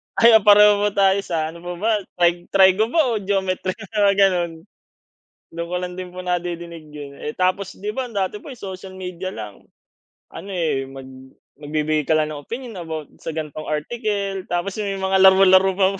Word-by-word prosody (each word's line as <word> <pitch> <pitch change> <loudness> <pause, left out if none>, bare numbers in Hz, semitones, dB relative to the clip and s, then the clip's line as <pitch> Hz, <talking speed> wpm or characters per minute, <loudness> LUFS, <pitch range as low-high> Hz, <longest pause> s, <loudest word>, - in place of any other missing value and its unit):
Ay, 230 0 +6
oo, 220 - +7
pareho 205 0 +6
tayo. 195 0 +4
Sa 160 -2 -2
ano 170 - -12
pa 175 +1 -6
ba 215 +6 0 0.2
Tri 175 0 +1
Trigo 195 +3 +4
ba 265 -2 +2
o 220 - 0
Geometry, 190 -2 -1
mga 210 -2 +1
ganun. 180 -4 +3 1.0
Do'n 170 0 -4
ko 180 - -3
lang 180 0 -5
din 185 -1 -6
po 185 - -9
nadinig 170 -3 -4
yun 145 -2 -9
eh. 150 - -3
Tapos 185 +1 -1
'di 210 +2 -4
ba 255 -1 -3
dati 200 0 -2
po 285 - -10
social 190 -1 -8
media 185 0 -5
lang 105 -2 -9 0.7
ano 195 - -9
eh 160 -7 -1
mag 135 -1 -10 0.5
magbibigay 150 0 -1
ka - - +3
lang 155 0 0
ng 145 - -7
opinyon 240 -2 -7
about 160 -3 -6
sa - - -8
gano'ng 155 0 -5
article 195 +3 -2
tapos 175 +3 -2
may 200 -1 -2
mga 190 0 +1
laro-laro 190 0 +6
pa 190 -1 +4
185 Hz, 180 wpm, -21 LUFS, 170-200 Hz, 1.0 s, oo